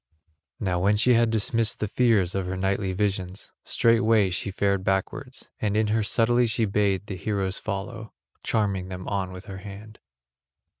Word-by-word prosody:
Now 90 Hz, -3 st, 0 dB
when 100 Hz, +3 st, +3 dB
she 125 Hz, +4 st, +4 dB
had 115 Hz, 0 st, +4 dB
dismissed 110 Hz, -1 st, 0 dB
the 105 Hz, -, -1 dB
fears 105 Hz, -6 st, +2 dB
of 95 Hz, -2 st, -2 dB
her 95 Hz, +1 st, -3 dB
nightly 95 Hz, 0 st, 0 dB
visions, 95 Hz, -1 st, -2 dB
straightway 115 Hz, -4 st, +3 dB
she 90 Hz, -, -1 dB
fared 100 Hz, -1 st, 0 dB
backwards, 125 Hz, +8 st, -2 dB
and 105 Hz, -1 st, 0 dB
in 110 Hz, -1 st, +2 dB
her 110 Hz, -, +2 dB
subtlety 120 Hz, +3 st, +2 dB
she 110 Hz, 0 st, +1 dB
bade 100 Hz, -1 st, +1 dB
the 100 Hz, -, -5 dB
heroes 95 Hz, -1 st, -2 dB
follow, 110 Hz, +2 st, -5 dB, 0.3 s
charming 100 Hz, -4 st, 0 dB
them 95 Hz, 0 st, -7 dB
on 95 Hz, -2 st, -2 dB
with 95 Hz, +1 st, -10 dB
her 95 Hz, -3 st, -8 dB
hand. 105 Hz, +2 st, -11 dB
100 Hz, 165 wpm, -25 LUFS, 95-110 Hz, 0.3 s, she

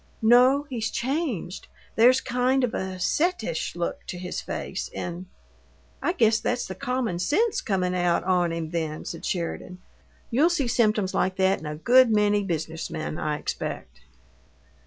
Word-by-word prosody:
"No. 250 Hz, +5 st, +5 dB
He's 230 Hz, -5 st, -3 dB
changed. 255 Hz, -, -3 dB, 0.3 s
There's 250 Hz, +3 st, +5 dB
kind 250 Hz, +2 st, +1 dB
of 245 Hz, -, 0 dB
a 190 Hz, 0 st, -3 dB
settish 220 Hz, -, -1 dB
look 175 Hz, 0 st, -3 dB
to 180 Hz, -, -5 dB
his 180 Hz, 0 st, -4 dB
face, -, -, -5 dB
and 175 Hz, +1 st, -5 dB, 0.4 s
" -, -, -33 dB
"I 345 Hz, -, 0 dB
guess 225 Hz, -, +3 dB
that's 245 Hz, 0 st, -1 dB
the 190 Hz, -, -6 dB
common 235 Hz, -2 st, -2 dB
sense 410 Hz, -, +1 dB
comin' 185 Hz, -3 st, 0 dB
out 175 Hz, -2 st, +1 dB
on 180 Hz, -2 st, +2 dB
him, 165 Hz, -1 st, -4 dB
then," 160 Hz, -2 st, -3 dB
said 165 Hz, -, -6 dB
Sheridan. 180 Hz, 0 st, -3 dB, 0.5 s
"You'll 285 Hz, +9 st, +4 dB
see 300 Hz, -7 st, 0 dB
symptoms 215 Hz, -5 st, +1 dB
like 185 Hz, 0 st, 0 dB
that 190 Hz, 0 st, +2 dB
in 155 Hz, -, -8 dB
a 150 Hz, -, -4 dB
good 245 Hz, +10 st, +5 dB
many 210 Hz, -1 st, +3 dB
business 160 Hz, -3 st, -3 dB
men, 155 Hz, -1 st, -4 dB
I 150 Hz, -1 st, -1 dB
expect." -, -, -5 dB
200 Hz, 160 wpm, -25 LUFS, 175-250 Hz, 0.5 s, No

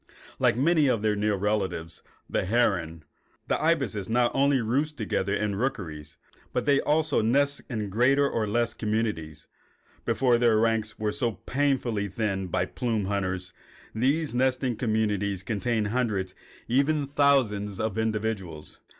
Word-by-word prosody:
Like -, -, +3 dB
many 155 Hz, +2 st, +3 dB
of 115 Hz, -5 st, +1 dB
their 105 Hz, -1 st, +2 dB
near 105 Hz, 0 st, +1 dB
relatives, 95 Hz, -5 st, -2 dB, 0.3 s
the -, -, -1 dB
herons, 90 Hz, -7 st, 0 dB, 0.4 s
the -, -, 0 dB
ibises 135 Hz, -, 0 dB
not 120 Hz, +1 st, +2 dB
only 140 Hz, 0 st, +3 dB
roost 140 Hz, +7 st, -1 dB
together 100 Hz, -3 st, -1 dB
in 105 Hz, -1 st, -1 dB
rookeries, 85 Hz, -, -4 dB, 0.4 s
but -, -, -1 dB
they 140 Hz, -1 st, +4 dB
also 155 Hz, 0 st, +1 dB
nest 140 Hz, +5 st, +1 dB
in 110 Hz, -5 st, -3 dB
greater 130 Hz, +7 st, +3 dB
or 110 Hz, -5 st, -1 dB
less 120 Hz, +3 st, 0 dB
communities. 105 Hz, -9 st, -2 dB, 0.6 s
Before 125 Hz, -3 st, +2 dB
their 120 Hz, -2 st, +4 dB
ranks 110 Hz, -1 st, 0 dB
were 105 Hz, -1 st, -1 dB
so 115 Hz, +1 st, -1 dB
painfully 130 Hz, -6 st, -1 dB
thinned 95 Hz, -2 st, -2 dB
by -, -, +1 dB
the -, -, -17 dB
plume 115 Hz, -5 st, -1 dB
hunters, 95 Hz, -2 st, -2 dB, 0.4 s
these 140 Hz, +7 st, +1 dB
nesting 130 Hz, 0 st, +1 dB
communities 105 Hz, -4 st, -1 dB
contained 110 Hz, 0 st, -1 dB
hundreds 105 Hz, -6 st, -1 dB, 0.4 s
and 125 Hz, +3 st, +3 dB
even 145 Hz, +1 st, +1 dB
thousands 130 Hz, -9 st, +1 dB
of 110 Hz, 0 st, -1 dB
individuals. 105 Hz, -8 st, -3 dB
110 Hz, 145 wpm, -27 LUFS, 100-130 Hz, 0.6 s, they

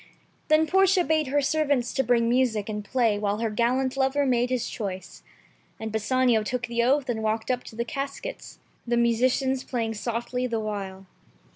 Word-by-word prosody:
Then 310 Hz, +1 st, +4 dB
Portia 380 Hz, +1 st, +4 dB
bade 315 Hz, -3 st, +1 dB
her 285 Hz, +2 st, +1 dB
servants 285 Hz, -5 st, +1 dB
to 265 Hz, -, +1 dB
bring 235 Hz, -2 st, +2 dB
music 235 Hz, -4 st, +1 dB
and 210 Hz, -1 st, -4 dB
play 225 Hz, -3 st, +1 dB
while 205 Hz, 0 st, 0 dB
her 225 Hz, 0 st, -1 dB
galliant 255 Hz, +4 st, +1 dB
lover 270 Hz, +1 st, +1 dB
made 245 Hz, -1 st, +2 dB
his 250 Hz, -2 st, -1 dB
choice. 190 Hz, -4 st, -6 dB, 0.6 s
And 220 Hz, 0 st, -5 dB
Bassanio 235 Hz, +1 st, +2 dB
took 245 Hz, +3 st, -2 dB
the 235 Hz, 0 st, -1 dB
oath 270 Hz, +3 st, +2 dB
and 230 Hz, -3 st, -2 dB
walked 220 Hz, +2 st, -1 dB
up 250 Hz, -1 st, -2 dB
to 220 Hz, -, -11 dB
the 235 Hz, +1 st, -2 dB
caskets 275 Hz, -, -6 dB
— -, -, -37 dB
the 240 Hz, 0 st, +1 dB
musicians 255 Hz, +3 st, +2 dB
playing 230 Hz, -3 st, -2 dB
softly 240 Hz, +3 st, -3 dB
the 230 Hz, -2 st, -2 dB
while. 195 Hz, -3 st, -5 dB
245 Hz, 180 wpm, -26 LUFS, 220-265 Hz, 0.6 s, Then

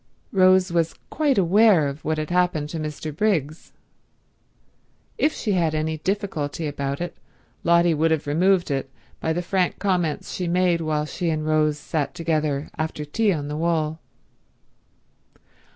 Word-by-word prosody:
Rose 185 Hz, -1 st, +4 dB
was 165 Hz, -1 st, +1 dB, 0.2 s
quite 295 Hz, -4 st, +1 dB
aware 195 Hz, -3 st, +5 dB
of 140 Hz, +2 st, -6 dB
what 155 Hz, +1 st, -1 dB
had 155 Hz, +2 st, -3 dB
happened 175 Hz, -4 st, +1 dB
to 165 Hz, -, -4 dB
Mr. 155 Hz, 0 st, -5 dB
Briggs. 160 Hz, -6 st, -1 dB, 1.5 s
If 310 Hz, -, +3 dB
she 220 Hz, -, -3 dB
had 185 Hz, -3 st, +2 dB
had 160 Hz, -2 st, 0 dB
any 155 Hz, +1 st, -1 dB
difficulty 170 Hz, -5 st, -2 dB
about 140 Hz, -1 st, -3 dB
it, 175 Hz, -1 st, -4 dB, 0.5 s
Lotty 170 Hz, 0 st, +4 dB
would 160 Hz, +1 st, +2 dB
have 160 Hz, -2 st, 0 dB
removed 175 Hz, +3 st, +2 dB
it 135 Hz, -1 st, -2 dB, 0.3 s
by 160 Hz, -, -1 dB
the 175 Hz, +2 st, -1 dB
frank 185 Hz, 0 st, 0 dB
comments 180 Hz, -6 st, -1 dB
she 180 Hz, -, -3 dB
made 175 Hz, -1 st, +2 dB
while 155 Hz, -1 st, -1 dB
she 170 Hz, +3 st, -3 dB
and 155 Hz, -1 st, -1 dB
Rose 155 Hz, -1 st, +2 dB
sat 150 Hz, 0 st, -3 dB
together 155 Hz, -3 st, -1 dB
after 155 Hz, -1 st, -3 dB
tea 210 Hz, +8 st, +1 dB
on 150 Hz, -5 st, -2 dB
the 150 Hz, -, -4 dB
wall. 160 Hz, -1 st, 0 dB
160 Hz, 155 wpm, -23 LUFS, 150-180 Hz, 1.5 s, aware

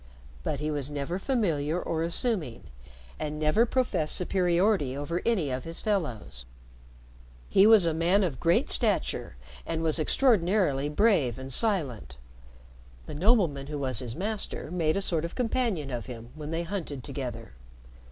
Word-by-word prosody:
But 140 Hz, -, -3 dB
he 150 Hz, +1 st, -2 dB
never 145 Hz, +2 st, -3 dB
was 190 Hz, -, -11 dB
familiar 170 Hz, -, 0 dB
or 165 Hz, -2 st, -2 dB
assuming, 170 Hz, -, +1 dB, 0.6 s
and 150 Hz, 0 st, -4 dB
never 155 Hz, +10 st, +2 dB
professed 235 Hz, -12 st, 0 dB
superiority 180 Hz, -5 st, +1 dB
over 165 Hz, +5 st, -3 dB
any 185 Hz, -, +1 dB
of 130 Hz, 0 st, -3 dB
his 165 Hz, 0 st, -1 dB
fellows. 115 Hz, -, -3 dB, 1.0 s
He 195 Hz, +2 st, +6 dB
was 220 Hz, -5 st, +7 dB
a 165 Hz, -, +1 dB
man 175 Hz, +5 st, +2 dB
of 160 Hz, -8 st, -2 dB
great 170 Hz, 0 st, +2 dB
stature, -, -, 0 dB, 0.3 s
and 165 Hz, 0 st, -3 dB
was 160 Hz, 0 st, +2 dB
extraordinarily 175 Hz, -, +2 dB
brave 150 Hz, -, +2 dB
and 130 Hz, 0 st, -6 dB
silent. 130 Hz, -, -1 dB, 0.9 s
The -, -, -8 dB
nobleman 165 Hz, -, +2 dB
who 150 Hz, 0 st, -4 dB
was 130 Hz, -3 st, -1 dB
his 120 Hz, -3 st, -5 dB
master 200 Hz, -3 st, -4 dB
made 165 Hz, -1 st, 0 dB
a 200 Hz, -, -1 dB
sort 165 Hz, -4 st, -1 dB
of 170 Hz, -, -5 dB
companion 225 Hz, -, -1 dB
of 120 Hz, 0 st, -5 dB
him 120 Hz, -1 st, -9 dB
when 150 Hz, -1 st, -8 dB
they 165 Hz, +1 st, -2 dB
hunted 165 Hz, -8 st, -5 dB
together. 125 Hz, -5 st, -6 dB
160 Hz, 150 wpm, -28 LUFS, 140-195 Hz, 1.0 s, was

